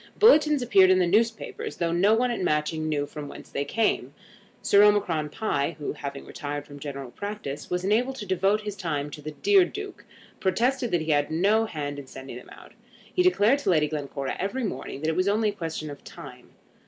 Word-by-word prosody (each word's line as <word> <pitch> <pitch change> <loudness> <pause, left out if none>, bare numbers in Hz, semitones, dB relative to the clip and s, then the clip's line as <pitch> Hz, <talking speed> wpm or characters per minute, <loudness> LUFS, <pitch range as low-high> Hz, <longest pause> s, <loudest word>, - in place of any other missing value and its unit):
Bulletins 300 - +5
appeared 195 -6 +5
in 185 - +5
the 185 - +3
newspapers, 225 +5 0
though 170 -1 0
no 195 +6 +4
one 245 +2 +1
at 235 - -3
Matching 155 -1 0
knew 145 -2 0
from 150 0 -8
whence - - -11
they 140 - -1
came. 220 +10 0 0.5
Sir 200 - +5
Omicron 185 -7 +3
Pie, 155 -5 -1
who, 150 - -4
having 140 -2 -7
retired 145 0 -5
from 145 -1 -11
general 140 -3 -6
practice, 200 -8 -6
was 180 0 -1
enabled 235 +7 +1
to 215 - -6
devote 195 +3 +1
his 210 -1 -5
time 150 -6 -3
to 150 - -9
the 150 - -6
"dear 390 - +4
Duke," 400 +2 -7 0.4
protested 240 +6 +1
that 175 -4 +1
he 155 0 -1
had 145 -1 +2
no 205 +7 +2
hand 145 -5 -4
in 140 - -10
sending 130 -2 -9
them 125 - -13
out. - - -14 0.4
He 365 - +2
declared 280 - +4
to 285 - -2
Lady 155 -4 +3
Glencora 140 -2 -4
every 200 +8 -2
morning 190 -8 -5
that 155 - 0
it 160 - -1
was 185 +1 +1
only 215 +1 +2
a - - -4
question 160 -5 -5
of 145 - -11
time. - - -12
180 Hz, 210 wpm, -26 LUFS, 150-215 Hz, 0.5 s, Bulletins